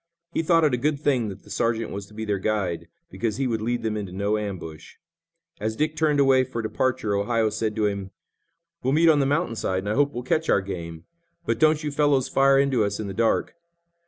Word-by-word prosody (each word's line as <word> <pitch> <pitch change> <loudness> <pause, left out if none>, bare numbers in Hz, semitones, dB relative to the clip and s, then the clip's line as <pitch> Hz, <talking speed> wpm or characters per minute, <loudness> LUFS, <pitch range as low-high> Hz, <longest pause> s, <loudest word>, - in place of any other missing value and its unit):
He - - +1
thought 165 0 +3
it 150 -4 +3
a - - +2
good 145 +3 0
thing 130 -7 +1
that 95 - -9
the - - -14
sergeant 115 -1 -1
was 100 0 -6
to 105 - -17
be 110 0 -4
their 100 -2 -1
guide, 95 -5 -1 0.2
because 115 -2 -2
he 135 - 0
would 115 -3 -1
lead 120 +2 -1
them 110 -1 -1
into 100 -4 -4
no 100 +3 0
ambush. 90 -7 -6 0.6
As 110 0 -2
Dick 155 +4 -1
turned 150 -2 +2
away 135 -2 +5
for 120 -3 -5
departure 125 -1 -1
Ohio 110 +2 +1
said 110 0 -2
to 110 -2 +1
him: 100 -2 -2 0.7
"We'll 130 - 0
meet 165 +2 +5
on 150 -2 +5
the 135 - +2
mountain 145 -3 0
side, 95 -2 -1
and 100 - -3
I - - +1
hope 145 +3 +2
we'll 120 -1 -5
catch 155 +5 0
our 100 - +4
game, 85 -4 -7 0.4
but 115 0 -1
don't 155 +1 +3
you 150 - -2
fellows 140 -2 +2
fire 135 0 +4
into 135 -4 +3
us 100 0 -2
in 110 - -3
the 100 - -5
dark." 115 +3 +1
115 Hz, 235 wpm, -24 LUFS, 105-140 Hz, 0.7 s, away